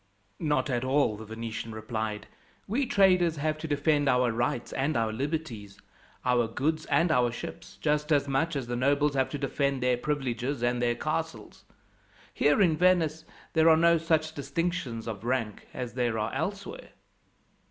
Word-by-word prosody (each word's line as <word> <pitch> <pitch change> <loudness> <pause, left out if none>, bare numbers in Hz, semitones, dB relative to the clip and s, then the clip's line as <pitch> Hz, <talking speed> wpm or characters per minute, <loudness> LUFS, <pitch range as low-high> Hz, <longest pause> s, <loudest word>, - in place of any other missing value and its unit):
"Not 150 -2 +1
at 120 0 0
all," 130 -4 +2
the 110 +1 -9
Venetian 115 0 -6
replied. 110 -1 -4 0.4
"We 255 +6 0
traders 180 -5 +4
have 155 +1 -1
to 160 - -5
defend 145 -1 +2
our 125 -2 +3
rights 120 +1 -2
and 140 +3 0
our 110 -1 0
liberties, 125 -7 -4 0.5
our 125 -2 +3
goods 155 +7 -1
and 155 +4 +3
our 125 -3 +3
ships, 120 - -8
just 150 0 0
as 145 -1 +3
much 145 +4 0
as 135 -3 -2
the 120 0 -3
nobles 140 +3 +2
have 135 -1 +1
to 145 - -4
defend 140 -1 -1
their 125 -1 +2
privileges 130 -2 -2
and 120 0 +1
their 120 -1 +1
castles. - - -4 0.7
Here 145 +7 +3
in 165 -4 +3
Venice 160 -3 +2 0.3
there 160 0 +5
are 160 - +6
no 170 0 +4
such 160 -1 +1
distinctions 140 -5 -3
of 110 -2 -5
rank 115 -4 -2
as 125 -2 -5
there 120 -2 0
are 110 +1 -2
elsewhere. 205 - -4
140 Hz, 165 wpm, -28 LUFS, 120-155 Hz, 0.7 s, are